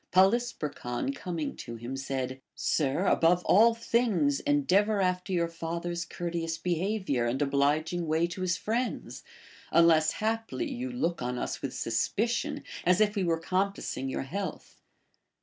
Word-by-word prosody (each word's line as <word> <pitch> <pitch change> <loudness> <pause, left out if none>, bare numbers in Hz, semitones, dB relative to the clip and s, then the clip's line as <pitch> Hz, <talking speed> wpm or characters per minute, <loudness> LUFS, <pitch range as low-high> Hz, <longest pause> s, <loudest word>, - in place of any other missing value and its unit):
Poly 190 +6 +6
sperchon 150 - -4
coming 170 - -4
to 120 - -7
him 120 +3 -6
said: 130 -1 -3
Sir, 150 +5 0
above 175 0 +3
all 225 +3 +6
things 220 - +1
en 145 0 +3
deavor 205 +5 +3
after 180 0 0
your 170 -2 +1
father 170 +1 -4
s 170 0 -3
courteous 170 -1 -3
behavior 180 - 0
and 125 +3 -1
obliging 150 +4 +1
way 160 +2 +2
to 175 +2 -6
his 185 0 +1
friends, 235 +5 -2 0.5
unless 160 -2 +5
haply 225 +8 -2
you 255 +1 -4
look 245 - -1
on 125 0 -2
us - - -3
with 135 - -4
sus 115 0 0
picion 235 +3 0 0.2
as 180 +2 +4
if 210 0 +3
we 200 - +1
were 165 -2 +1
compassing 185 -5 -2
your - - -2
health. 185 +5 -6
170 Hz, 155 wpm, -29 LUFS, 145-200 Hz, 0.5 s, Poly